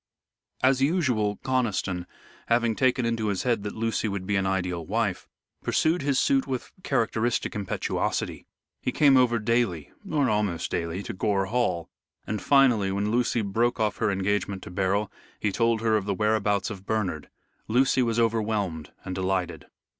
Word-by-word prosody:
As 135 0 +4
usual, 130 - +1
Conniston, 105 -9 -1 0.4
having 115 -1 +2
taken 130 0 +2
into 115 -2 0
his 100 -3 -1
head 120 -4 +1
that 105 0 -5
Lucy 115 0 -1
would 100 -2 -3
be 105 +2 0
an 95 -1 +1
ideal 90 -3 -1
wife, 100 +1 -1 0.3
pursued 165 +3 +1
his 140 -1 +1
suit 135 0 +2
with 130 -2 -4
characteristic 120 -4 0
impetuosity. 100 -3 -2 0.3
He - - -1
came 140 -3 +5
over 125 -2 +4
daily 110 -8 0 0.2
or 145 -4 +2
almost 100 -6 0
daily 85 +3 -2
to 115 - -5
Gore 100 0 0
Hall, 95 -6 0 0.4
and, 110 -3 -3
finally, 120 -8 +4
when 100 +2 -1
Lucy 120 -1 +1
broke 115 +5 0
off 110 -2 0
her 110 - +1
engagement 100 0 -1
to - - -9
Beryl, 100 +3 0 0.3
he 105 - 0
told 115 +1 +1
her 110 -1 +2
of 100 - -3
the 100 - -1
whereabouts 105 -1 +1
of 100 -2 -9
Bernard. 110 -4 -2 0.4
Lucy 130 +3 +3
was 115 -2 +1
overwhelmed 105 -8 0
and 95 - -4
delighted. 95 -4 -2
110 Hz, 160 wpm, -26 LUFS, 95-120 Hz, 0.4 s, came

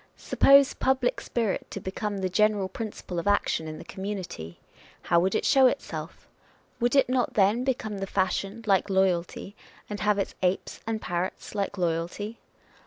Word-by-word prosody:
Suppose 275 0 +5
public 260 -1 +1
spirit 225 -5 -2
to - - -5
become 200 +2 -4
the 190 -1 -1
general 205 +1 +2
principle 190 -3 -5
of 170 - -4
action 205 -5 +1
in 155 0 -6
the - - -9
community 190 - -6 0.2
â€" - - -30 0.3
how 170 - +5
would 185 +2 +1
it - - 0
show 270 -2 +6
itself? - - -4 0.5
Would 240 +2 +1
it 275 - +5
not 255 0 0
then 210 +4 +3
become 220 -6 -2
the 195 - -3
fashion, 195 +3 -1
like 195 -1 +2
loyalty, 190 +1 0 0.3
and 205 -1 -5
have 210 +2 +2
its 195 - -2
apes 185 0 -1
and 225 -1 -1
parrots, 175 +1 -3
like 200 -1 -2
loyalty? 175 +6 -2
200 Hz, 170 wpm, -27 LUFS, 185-225 Hz, 0.5 s, show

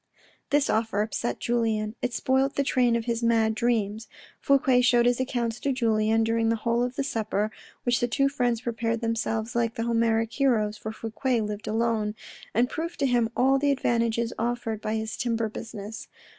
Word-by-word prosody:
This 290 -1 +3
offer 220 -2 +1
upset 225 +2 -3
Julien. 220 -3 0
It 250 - -1
spoilt 265 +3 +1
the 280 - +2
train 250 -3 +2
of 230 -1 -1
his 235 -1 -1
mad 225 -1 +3
dreams. 220 -2 -1 0.3
Fouque 265 -2 +3
showed 240 -1 +4
his 245 0 +2
accounts 240 -3 -1
to 280 - 0
Julien 225 -3 +2
during 225 0 +1
the 230 - +2
whole 230 +2 0
of 250 +1 -1
the - - -1
supper 215 -4 -1 0.2
— - - -26
which 245 -1 +2
the 240 - +1
two 275 +4 +2
friends 245 -5 0
prepared 230 -1 -2
themselves 225 0 -2
like 230 -1 0
the 230 - -2
Homeric 230 -1 +1
heroes 220 -6 +1
(for 220 +1 -6
Fouque 225 +1 -1
lived 210 0 -6
alone) 220 -1 0 0.4
and 240 +3 +2
proved 335 +5 -5
to 280 - +1
him 240 -3 +2
all 270 +2 +4
the 285 +1 +2
advantages 235 -3 +1
offered 230 -2 -2
by 215 +1 -2
his 220 0 -3
timber 230 -2 -1
business. 215 0 -7
230 Hz, 185 wpm, -26 LUFS, 220-245 Hz, 0.4 s, showed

